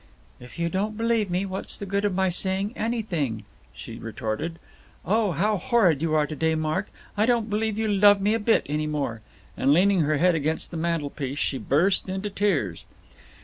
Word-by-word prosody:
"If 125 +5 -13
you 170 0 0
don't 205 +4 -2
believe 225 -3 +1
me, 180 +2 0
what's 190 0 -4
the 200 - -6
good 200 +1 -1
of 200 -3 0
my 190 0 +2
saying 190 +4 +1
anything?" 175 - -2 0.3
she - - -9
retorted. 150 +10 -4 0.5
"Oh, 215 0 +2
how 205 +7 +1
horrid 195 - +2
you 160 -1 0
are 150 -1 +3
to 155 - -6
day, 160 +2 +1
Mark. 155 +5 -1 0.3
I 210 +2 +2
don't 230 -3 +1
believe 215 0 -1
you 220 0 0
love 205 0 +5
me 205 +2 +1
a 225 - +1
bit, 225 +2 +2
any 150 +1 -1
more." 140 -7 -3 0.3
And 135 - +2
leaning 190 +5 +4
her 155 0 +1
head 180 +3 +4
against 160 0 -2
the 170 - -5
mantelpiece, 145 -4 -2
she 135 -2 -1
burst 170 - +1
into 190 +2 -3
tears. 165 - -1
185 Hz, 190 wpm, -25 LUFS, 155-205 Hz, 0.5 s, love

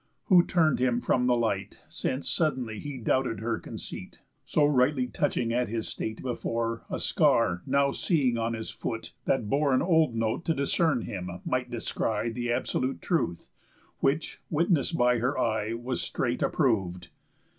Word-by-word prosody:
Who 180 -3 +8
turn'd 160 -5 +2
him 125 -1 +2
from 125 0 +1
the 125 - +4
light, 100 -5 -2
Since 130 +2 -3
suddenly 130 -9 0
he 145 -2 -6
doubted 125 -1 0
her 115 0 -1
conceit, - - -8 0.2
So 150 - +2
rightly 130 -1 +3
touching 125 -3 -1
at 125 -1 0
his 115 0 -2
state 110 0 -5
before, 115 -2 -2
A - - -2
scar 90 -7 +2
now 140 +1 +3
seeing 135 -9 +1
on 115 0 -1
his 110 0 -5
foot, 115 -2 -5
that 115 -5 +1
bore 140 +3 +2
An - - +2
old 160 -7 +3
note, 115 +7 -1
to 165 - +1
discern 140 -1 +1
him, 90 -5 -5 0.2
might 125 -1 -1
descry 115 -1 -2
The 120 +1 -2
absolute 130 +2 -1
truth; 85 - -1 0.5
which, 145 +4 0
witness'd 165 0 +1
by 125 -1 +3
her 125 +4 0
eye, 110 -2 0
Was 120 +2 -3
straight 120 -1 -2
approv'd. 95 - 0
125 Hz, 160 wpm, -28 LUFS, 115-140 Hz, 0.5 s, Who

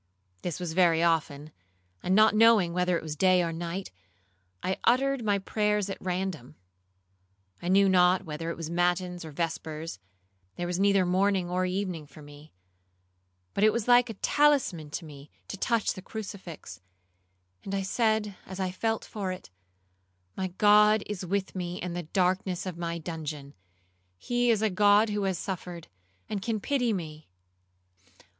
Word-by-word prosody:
This 175 -1 -4
was 175 -3 -4
very 170 -2 +4
often, 155 -3 0 0.5
and 185 +1 +1
not 215 +1 +6
knowing 215 -5 +5
whether 180 -1 +1
it - - -7
was 155 -1 -5
day 185 +2 +4
or 165 -1 -2
night, 170 - -5 0.7
I 185 - -1
uttered 270 +1 +2
my 205 -2 +2
prayers 210 0 0
at - - -7
random. 180 -7 -3 1.1
I - - -5
knew 195 +2 +5
not 185 0 +4
whether 160 +1 -5
it 170 - -4
was 165 -2 -5
matins 175 +1 0
or 160 - -8
vespers; 160 - -4 0.6
there 175 - -3
was 175 +1 -2
neither 200 -1 +4
morning 185 0 +1
or 185 0 0
evening 180 -5 -3
for 150 +2 -14
me, 145 +1 -14 1.0
but 200 - 0
it 215 - +6
was 235 0 -2
like 245 0 +5
a 225 - -5
talisman 265 - +2
to 165 +3 -5
me 145 -1 -12 0.2
to - - -4
touch 230 +2 0
the 185 - -9
crucifix, 185 - -8 0.8
and 195 - -4
I 195 - -1
said 215 0 0
as 190 0 -8
I 185 -1 -1
felt 225 +4 -2
for 200 -3 -4
it, 185 - -9 0.8
'My 190 - -2
God 210 0 +5
is 205 -3 -5
with 190 +2 -2
me 180 -1 -4
in 180 -1 -4
the 175 - -3
darkness 185 0 0
of 185 -3 -4
my 170 0 -3
dungeon; 150 -3 -6 0.6
he 245 - 0
is 220 -2 +2
a 215 - +2
God 205 +3 +4
who 205 -1 -1
has 190 -2 0
suffered, 180 -3 -6 0.4
and 205 -2 -3
can 220 +1 -2
pity 245 0 0
me. 155 - -6
185 Hz, 165 wpm, -28 LUFS, 170-205 Hz, 1.1 s, not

